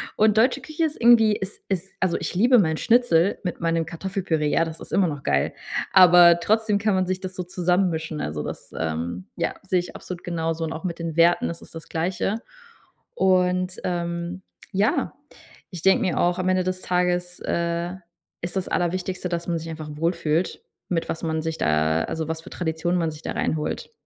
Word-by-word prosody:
und 215 0 +4
deutsche 255 +4 +3
Küche 310 +4 -3
ist 305 - -4
irgendwie 225 -3 +6
ist 190 +2 -6
ist, 190 0 -2
also 185 -2 +1
ich - - -4
liebe 240 +7 +5
mein 160 -4 +2
Schnitzel 205 -6 +3
mit 180 - -3
meinem 165 -1 +1
Kartoffelpüree, 170 -2 -2
ja, 165 - +3
das 160 0 -7
ist - - -10
immer 195 - +4
noch 145 -3 -4
geil. 70 - +1 0.4
Aber 175 -2 +8
trotzdem 215 +2 +2
kann 210 -2 +1
man 185 - +2
sich 185 0 -2
das 185 -1 -6
so 180 - -3
zusammen 180 +1 +1
mischen, 160 -1 -4
also 75 0 -3
das, - - -7
ähm, 85 +3 -3
ja, - - -1
sehe 185 -1 +1
ich 175 - -7
absolut 180 -1 -8
genauso 165 -1 -2
und 160 0 -3
auch 165 +4 -7
mit 170 - -3
den 165 -2 -4
Werten, 170 +1 +4
das 170 - -6
ist - - -14
das 160 - -8
Gleiche. 185 +6 -1 0.7
Und, 185 -1 +2
ähm, 170 +1 -3 0.3
ja, 200 +4 +1 0.6
ich 175 -3 -7
denke 190 - +5
mir 180 - 0
auch, 175 +1 +2
am 185 0 0
Ende 185 0 +2
des 185 0 -3
Tages, 180 0 0
äh, 170 +1 -1 0.5
ist 175 +2 -5
das 190 -1 -1
Allerwichtigste, 180 +1 -1
dass 170 0 -3
man 170 -1 0
sich 165 +1 -7
einfach 155 -1 -6
wohl 165 +4 0
fühlt, 165 +1 -1 0.3
mit 170 -2 -1
was 165 - -3
man 160 -1 -1
sich 160 0 -3
da 80 +1 +2
also 160 -1 -3
was 160 0 -3
für - - -12
Traditionen 175 +1 -1
man 165 -1 0
sich 155 +1 -11
da - - -3
reinholt. 160 - -2
175 Hz, 200 wpm, -24 LUFS, 165-185 Hz, 0.7 s, Aber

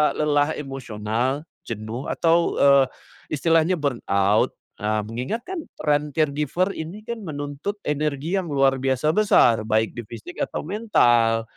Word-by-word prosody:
lelah 150 0 +1
emosional, 130 -1 -3 0.2
jenuh 115 +3 -5
atau, 170 0 +2
eee, 140 -1 +6 0.5
istilahnya 165 +3 +3
burnout? 105 -7 +1 0.2
Eee, 105 +1 0
mengingat 125 - -4
kan 370 +2 -5 0.2
trend 150 0 +1
caregiver 155 +5 0
ini 175 +7 -7
kan 235 0 -5
menuntut 145 +3 -4
energi 150 +3 -1
yang 185 - -5
luar 135 -1 +3
biasa 135 +3 +1
besar, 120 - +4
baik 110 0 +2
di 120 - -4
fisik 115 0 -9
atau - - -4
mental. 120 - +3
145 Hz, 130 wpm, -23 LUFS, 120-160 Hz, 0.5 s, eee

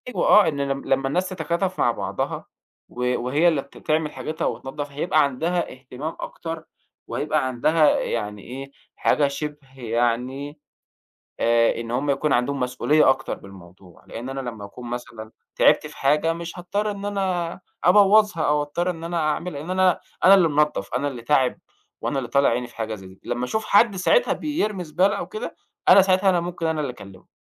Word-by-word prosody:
أيوه - - 0
آه، 210 -5 +7
إن 145 -3 -2
لم 140 0 -2
لمّا 135 0 +1
الناس 180 +6 0
تتكاتف 185 +1 -2
مع - - +4
بعضها - - -4 0.4
و 125 0 -1
وهي 145 +8 +2
اللي 150 -5 +1
ت 140 - -16
تعمل 155 -1 0
حاجتها 155 +1 -4
وتنضف 135 +5 -4
هيبقى 155 +2 +2
عندها 165 +6 -1
اهتمام 130 +4 -7
أكتر، 165 -1 -6 0.4
وهيبقى 130 - 0
عندها 150 +5 +3
يعني 105 -3 -3
إيه 135 +2 -8 0.3
حاجة 145 -2 +2
شبه 140 -2 -7
يعني 125 +5 -1 0.8
آآ، 115 0 +3
إن 115 0 -6
همّ 135 +4 0
يكون 145 +1 +1
عندهم 135 +3 +1
مسؤوليّة 130 +4 +3
أكتر 135 0 -1
بالموضوع، 95 -2 -15
لإن 120 +3 -7
أنا 135 0 -4
لمّا 110 -3 -10
أكون 120 +4 -10
مثلًا 115 -2 -7 0.2
تعبت - - +4
في - - -11
حاجة 150 +4 +2
مش 170 +1 -7
هاضطر 205 +4 -2
إن 200 -1 -6
أنا 185 -4 -2 0.2
أبوظها 205 -1 +5
أو 150 0 +2
أضطر 175 +5 -2
إن 165 -1 -7
أنا 170 0 -2
أعمل، 160 +3 -1
لأن 150 +5 -6
أنا 185 -1 +3 0.2
أنا 195 +2 +9
اللي 180 -4 +5
منضف، 150 -9 0
أنا 140 +3 0
اللي 125 -4 -7
تاعب، 130 0 +2 0.4
وأنا 140 - -2
اللي 120 - -3
طالع 140 +2 +4
عيني 120 +1 0
في 120 - -19
حاجة 110 -1 -3
زي 95 -3 -11
دي، 95 - -17
لمّا 120 +1 -2
أشوف 220 +12 -2
حد 205 -1 +4
ساعتها - - +3
بيرمي 215 - -2
زبالة 185 +6 +1
أو - - -4
كده، 435 +2 -6 0.3
أنا 195 - +9
ساعتها 190 0 +3
أنا 175 -2 +2
ممكن 175 -1 -4
أنا 160 -1 0
اللي 135 -4 -2
أكلمه، 95 -5 -14
145 Hz, 185 wpm, -23 LUFS, 125-175 Hz, 0.8 s, أنا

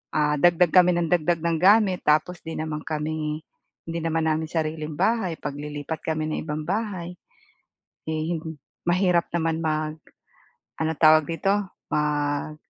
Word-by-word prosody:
ah, 150 -1 +2
dagdag 175 0 +4
kami 180 -1 +6
ng 170 -1 0
dagdag 170 -1 +2
ng 165 -1 +1
gamit 195 -1 +4
tapos 160 +4 +2
'di 160 - -6
naman 155 -1 -4
kami, 155 0 -3 0.4
hindi 165 0 -3
naman 165 -1 0
namin 160 +1 -1
sariling 155 -1 -3
bahay, 195 -4 +1
paglilipat 145 +2 -5
kami 155 -1 0
ng 155 - -2
ibang 155 0 -4
bahay. 185 -2 -3 0.9
Eh 160 +2 -1 0.5
mahirap 180 -1 +2
naman 165 -1 0
mag 155 -1 -1 0.8
ano 160 0 0
tawag 155 -1 +5
dito? 170 +4 0 0.4
Mag 150 0 0
160 Hz, 135 wpm, -25 LUFS, 155-175 Hz, 0.9 s, kami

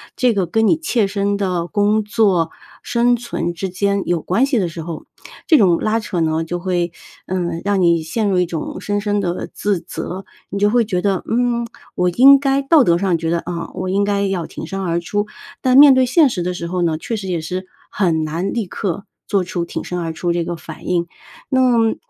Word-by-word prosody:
这 250 -2 +2
个 195 -3 0
跟 225 +4 +2
你 315 - +4
切 250 -9 +1
身 200 0 -1
的 180 -4 -1
工 210 +2 +1
作、 200 -6 +2 0.3
生 245 -2 +2
存 230 -7 -3
之 190 +2 -4
间 200 +2 0
有 175 -3 0
关 225 +9 +2
系 275 -4 0
的 180 - 0
时 165 0 -7
候， 165 -1 -7 0.4
这 315 - +6
种 180 -6 +4
拉 220 +1 +1
扯 190 -5 -3
呢 160 0 +1
就 175 +2 -3
会， 175 -2 -1 0.4
嗯， 170 -2 -2
让 200 -1 +1
你 170 -2 +3
陷 205 +7 -2
入 185 -2 +2
一 180 - +2
种 165 -3 -5
深 205 0 -1
深 205 0 0
地 175 -1 -3
自 200 -4 -1
责。 185 +3 -6 0.2
你 200 - -4
就 205 +1 +2
会 240 -1 +4
觉 190 -4 -1
得， 195 0 0
嗯， 235 0 0 0.3
我 180 0 +1
应 270 +8 +7
该 275 0 +1
道 295 -1 +5
德 170 -4 +3
上 185 -3 +1
觉 165 -1 -2
得， 170 - +1
啊， 170 -1 -4
我 185 - -3
应 200 +2 +1
该 200 0 0
要 190 -4 -2
挺 - - -7
身 195 +3 -5
而 170 -2 0
出， 205 +4 -2 0.3
但 255 0 +4
面 285 -1 +9
对 260 0 +4
现 305 +2 +5
实 180 -7 -3
的 180 +1 -2
时 170 - -5
候 180 +1 -2
呢， 160 -2 +1
确 225 +8 -4
实 200 -3 -5
也 175 -2 -1
是 185 +4 -5 0.2
很 165 -5 +1
难 165 +5 -2
立 230 -4 -1
刻 195 +1 -4 0.2
做 195 -2 +1
出 175 -1 -3
挺 - - -5
身 180 0 -4
而 165 -1 -3
出 170 +1 -1
这 170 -1 0
个 175 - -4
反 160 -1 -10
应。 175 -1 +1 0.4
那 260 -1 +2 0.2
么 225 -1 +2
190 Hz, 245 characters per minute, -19 LUFS, 175-215 Hz, 0.4 s, 面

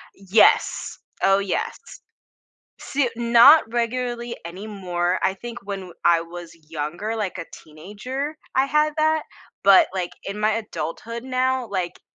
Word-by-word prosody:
Yes. 195 +2 +2 0.3
Oh 195 0 +5
yes. 195 -2 -2 1.0
Soo 275 -2 -1
Not 240 +6 +7
regularly 240 0 -2
anymore. 180 -1 -3
I 190 - +1
think 240 +4 -8
when 200 -1 -4
w 185 -2 -10
I 170 -1 +4
was 170 0 -10 0.2
younger, 165 +8 -4
like 205 -5 -3
a - - -4
teenager, 230 - -7 0.2
I 265 - +4
had 300 +2 +1
that, 315 0 +2 0.4
but, 195 -1 +6
like, 180 -2 -2
in 200 +2 -5
my 215 +1 +2
adulthood 225 +2 -5
now, 255 -1 0
like, 185 -3 -3
210 Hz, 135 wpm, -23 LUFS, 185-250 Hz, 1.0 s, Not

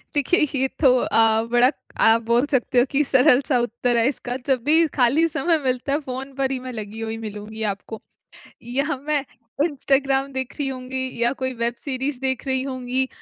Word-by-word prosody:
देखिए 290 +5 +2 0.2
ये 265 - +2
तो 260 -4 +5
अ, 225 -2 +3
बड़ा 245 +3 +5 0.3
आप 225 +1 +5
बोल 235 +4 +2
सकते 250 -1 +2
हो 245 - +4
कि 290 +2 +2
सरल 260 -1 +4
सा 260 -5 +2
उत्तर 240 +1 0
है 230 +2 +3
इसका। 250 -2 -3
जब 255 -3 +1
भी 320 +3 +5
खाली 275 +7 +4
समय 325 +2 +1
मिलता 255 +2 -1
है 295 - +1
फ़ोन 265 +1 -6
पर 270 -1 -1
ही 260 - -2
मैं 255 0 -7
लगी 215 0 -7
हुई 225 0 -4
मिलूँगी 215 0 -8
मैं 220 - -1
आपको। 200 +3 -7 0.6
या 275 +5 -1
मैं 295 -2 0 0.4
इंस्टाग्राम 275 -2 0
देख 260 -1 -4
रही 280 -2 -1
होंगी 260 0 -5 0.2
या 240 +2 +3
कोई 260 0 -1
वेब 235 0 0
सीरीज़ 265 -1 -3
देख 265 0 -2
रही 260 -1 0
होंगी। 260 -1 -2
260 Hz, 195 wpm, -22 LUFS, 240-275 Hz, 0.6 s, तो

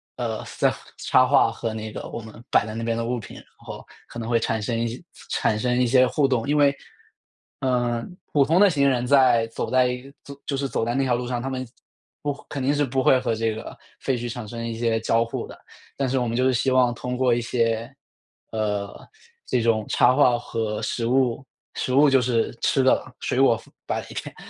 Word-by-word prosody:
呃 115 -3 -3 0.2
这 - - +3 0.3
插 130 - +4
画 135 -4 +4
和 115 -1 -4
那 110 0 -5
个 - - -7
我 115 - -6
们 110 -1 -11 0.2
摆 - - +3
在 110 - -6
那 115 - -4
边 115 0 0
的 115 - -2
物 120 +1 -2
品， 110 - -11
然 - - -12
后 - - -10 0.2
可 - - -11
能 115 0 -5
会 115 -1 +3
产 115 -1 -1
生 115 +2 -2
一 115 - 0
些 120 +8 -7 0.3
产 110 0 +1
生 125 0 0
一 125 - +4
些 130 +1 +5
互 145 +3 +1
动。 125 -2 0
因 145 - +1
为， 145 -1 +4 0.9
嗯， 120 +4 -1
普 140 -2 +4
通 165 +5 +2
的 205 - +7
行 140 -4 +3
人 125 -2 0
在 125 -4 +4
走 115 - -4
在 125 -1 +3 0.5
就 140 - -2
是 135 0 -2
走 115 - -1
在 120 +2 -1
那 135 - +2
条 130 -2 +1
路 120 0 -3
上， 120 -1 -2
他 135 - -3
们 130 -1 -4 0.5
不 145 - -1 0.2
肯 140 -2 -4
定 140 +3 +2
是 145 0 +1
不 130 +1 -1
会 130 - +5
和 115 -3 -1
这 115 0 0
个 110 - -8 0.2
废 130 - -1
墟 120 0 -4
产 115 -2 -6
生 115 +1 -6
一 115 -1 -4
些 115 -1 +1
交 115 +1 +2
互 115 - -5
的， - - -13 0.4
但 135 -1 0
是 130 +1 0
我 125 - 0
们 115 +1 -2
就 130 - +2
是 130 - +3
希 125 +2 +1
望 125 -2 +3
通 125 +1 -4
过 125 -2 +3
一 120 - 0
些 115 +1 -1 0.6
呃， 105 -2 -1 0.6
这 125 - 0
种 110 -2 +1
插 125 - +4
画 125 -4 +5
和 110 -3 -3
食 115 - -2
物- 130 +1 +1 0.3
食 130 - -1
物 145 +2 +6
就 135 - +5
是 120 -2 0
吃 135 - +3
的 130 - +5
了- 130 - -9
水 125 - -1
果 120 -4 +4 0.2
摆 - - -2
一 - - -9
点， - - -6
120 Hz, 250 characters per minute, -24 LUFS, 115-130 Hz, 0.9 s, 的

